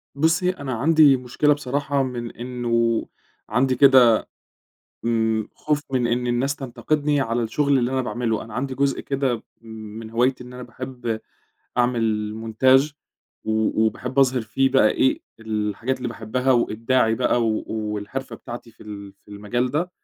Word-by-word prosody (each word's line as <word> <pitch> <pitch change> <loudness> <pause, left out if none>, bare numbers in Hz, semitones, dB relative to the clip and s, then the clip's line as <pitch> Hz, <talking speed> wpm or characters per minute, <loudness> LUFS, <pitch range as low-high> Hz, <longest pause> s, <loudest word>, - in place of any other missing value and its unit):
بُصي، 165 +5 +2
أنا 140 -8 -4
عندي 145 +2 +5
مشكلة 125 +4 +1
بصراحة 140 0 -1
من 120 -2 -4
إنه 120 -2 -1 0.4
عندي 130 +4 +2
كده 125 -4 +7 0.9
امم 110 -2 0
خوف 150 -1 -1
من 125 -2 +2
إن 120 +1 0
الناس 125 +4 0
تنتقدني 145 +3 -1
على 120 -2 0
الشغل 140 +5 +1
اللي 120 0 0
أنا 130 0 +1
باعمله، 120 -3 -2
أنا 110 -1 -11
عندي 130 +2 -2
جزء 135 0 0
كده 135 -4 -1 0.2
من 110 -1 -9
هوايتي 125 +2 +1
إن 125 - -12
أنا 125 0 -8
باحب 120 -2 -5 0.6
أعمل 115 -4 +1 0.3
montage 135 +3 +5 0.5
و 110 0 +1
وباحب 125 +4 -4
أظهر 130 -2 +4
فيه 135 +5 +1
بقى 110 -5 +5
إيه 130 - +2 0.2
الحاجات 110 +3 -2
اللي 125 - -3
باحبها، 120 +3 -1
وإبداعي 115 0 +2
بقى 120 0 +1
و 110 - -1
والحرفة 105 +4 -4
بتاعتي 120 -1 -9
في - - -17
ال 100 -2 -9
في - - -19
المجال 105 +5 -2
ده. 170 +6 -1
125 Hz, 150 wpm, -23 LUFS, 115-135 Hz, 0.9 s, كده